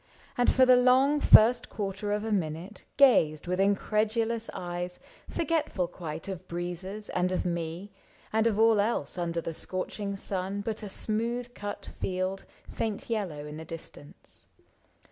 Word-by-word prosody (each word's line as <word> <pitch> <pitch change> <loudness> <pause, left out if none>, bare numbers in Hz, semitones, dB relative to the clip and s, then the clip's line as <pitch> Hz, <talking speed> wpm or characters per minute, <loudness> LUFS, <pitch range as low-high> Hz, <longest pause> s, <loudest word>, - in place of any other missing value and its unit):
And 245 - +3
for 260 - +5
the 255 0 +7
long 260 +4 +4
first 240 -1 +6
quarter 205 -1 -3
of 210 0 0
a 225 - -3
minute 180 +1 -3
Gazed 165 - +5
with 180 +1 -1
incredulous 220 +3 +1
eyes, 175 0 -5 0.3
forgetful 305 - -1
quite 160 0 -6
Of 185 -2 -6
breezes 180 +4 -5
and 180 0 0
of 185 - -1
me 170 +3 -3 0.4
and 220 +1 +3
of 215 -3 +1
all 225 -1 +5
else 200 -7 -1
Under 170 -1 -1
the 165 - -4
scorching 200 +4 -3
sun 195 +1 -3
but 220 +1 -3
a 210 - -6
smooth 235 +4 -2
cut 205 -2 -6
field. 185 +1 -2 0.2
Faint 220 +1 -4
yellow 180 -10 -2
in 150 0 -7
the 160 - -7
distance. 160 -3 -10
200 Hz, 150 wpm, -29 LUFS, 175-225 Hz, 0.4 s, the